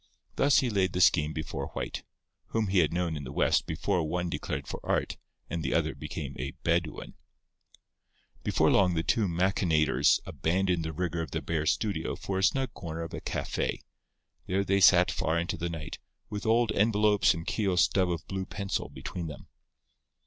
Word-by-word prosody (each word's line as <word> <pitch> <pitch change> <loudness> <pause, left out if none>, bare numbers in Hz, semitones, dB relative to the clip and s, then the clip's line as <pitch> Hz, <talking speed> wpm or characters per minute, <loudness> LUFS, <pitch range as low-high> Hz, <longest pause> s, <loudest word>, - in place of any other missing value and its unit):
Thus 140 -1 +4
he 125 -3 -1
laid 95 -3 +1
the 90 - -1
scheme 75 -4 +4
before 80 0 -4
White, - - -4 0.4
whom 110 -3 -1
he 95 -1 +3
had 80 -4 +3
known 85 -1 -1
in 75 - -5
the 65 - -7
West - - +2
before 85 +4 0
one 85 +2 -2
declared - - -4
for - - -5
Art - - 0 0.3
and 85 - -3
the - - -1
other - - +1
became - - -6
a - - -4
Bedouin. 85 -1 -1 1.3
Before - - +3
long 90 -3 +4
the 80 - 0
two 105 +3 +1
machinators 85 -3 +2
abandoned 90 0 0
the 80 - -3
rigour 85 +1 -2
of 80 - -5
the 80 - -3
bare 80 -1 -1
studio 100 +3 0
for 95 -1 -3
a - - -1
snug 130 +2 +1
corner 85 -1 -5
of 80 - -8
a - - -5
café. - - -2 0.7
There 95 +2 +1
they 100 0 +1
sat 90 -1 +6
far 80 +1 0
into 85 +1 -1
the 85 0 -3
night, 80 -1 -6 0.3
with 105 +1 -4
old 115 0 +3
envelopes 105 -2 +3
and 85 0 -6
Keogh's 95 -5 +1
stub 95 -2 +2
of 85 -3 -3
blue 95 -1 -4
pencil 100 -1 -3
between 85 -2 -6
them. 75 -3 -10
90 Hz, 185 wpm, -29 LUFS, 80-100 Hz, 1.3 s, sat